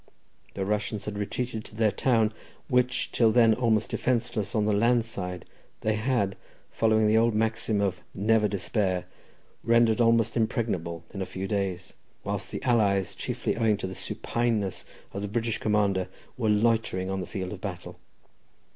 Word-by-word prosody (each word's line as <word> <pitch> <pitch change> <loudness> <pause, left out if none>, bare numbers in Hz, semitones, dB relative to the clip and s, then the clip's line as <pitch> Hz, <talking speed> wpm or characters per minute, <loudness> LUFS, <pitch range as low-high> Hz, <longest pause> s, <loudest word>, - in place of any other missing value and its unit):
The 95 - -2
Russians 105 0 -2
had 105 - -4
retreated 110 +2 -3
to - - -12
their 110 -1 +3
town, 110 -2 +2 0.3
which, 125 -2 +1
till 115 -2 +4
then 115 -1 +5
almost 110 -2 +1
defenceless 115 -4 -1
on 105 -1 +2
the 105 - +2
land 115 +3 +3
side, 90 -6 -5 0.4
they 110 - +1
had, 105 -3 0 0.4
following 110 -1 +3
their 110 +1 +4
old 115 -1 +2
maxim 110 -1 0
of 95 -3 -1
"never 105 +2 +3
despair," 95 -2 -1 0.6
rendered 115 0 +4
almost 115 -1 +3
impregnable 95 -8 -1
in 100 - -5
a - - -1
few 95 +1 -5
days, 95 -3 -2 0.3
whilst - - -3
the - - -6
allies, 100 -6 +2
chiefly - - -2
owing 110 -3 +2
to 100 - -4
the 95 - -5
supineness 110 -3 -2 0.3
of 100 - -4
the 105 - -2
British 115 +1 -1
commander, 100 -3 +1 0.3
were 115 -4 0
loitering 105 -3 +1
on 95 - -2
the 90 - -6
field 95 -2 -4
of 95 - -9
battle. 90 -4 -6
105 Hz, 165 wpm, -27 LUFS, 100-115 Hz, 0.6 s, then